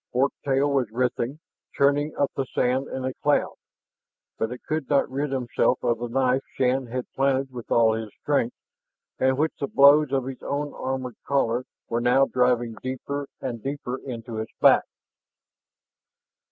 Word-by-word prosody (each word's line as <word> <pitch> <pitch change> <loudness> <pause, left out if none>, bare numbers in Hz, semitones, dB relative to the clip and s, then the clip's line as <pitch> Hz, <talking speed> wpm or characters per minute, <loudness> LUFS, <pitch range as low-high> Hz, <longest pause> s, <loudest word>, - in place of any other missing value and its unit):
Fork 135 +3 +2
tail 140 +1 +2
was 130 -5 +1
writhing, 125 +3 -1 0.4
churning 145 +2 +2
up 140 - +1
the 135 - -1
sand 130 +2 +1
in 130 -1 -4
a 130 - -2
cloud. 145 +2 +1 0.9
But 110 - -1
it 125 - -8
could 155 -3 -3
not 140 -1 +3
rid 140 +1 -2
itself 125 -1 +1
of 120 -2 +1
the 120 - -3
knife 130 +1 +1
Shann 130 0 +1
had 125 +1 -3
planted 135 0 +1
with 120 -2 -8
all 115 -1 +4
his 110 -1 -4
strength, 140 -5 0 0.6
and 130 0 +2
which 155 +2 +1
the 140 - -1
blows 140 +1 +6
of 135 -2 0
its 135 -1 -7
own 145 +1 -3
armored 130 -2 -4
collar 130 -3 +1 0.2
were 115 0 -1
now 125 +3 +4
driving 125 -3 +1
deeper 135 +2 -4
and 120 -4 -4
deeper 135 -1 -4
into 115 -3 -6
its 110 - -6
back. - - +6
130 Hz, 165 wpm, -25 LUFS, 125-140 Hz, 0.9 s, blows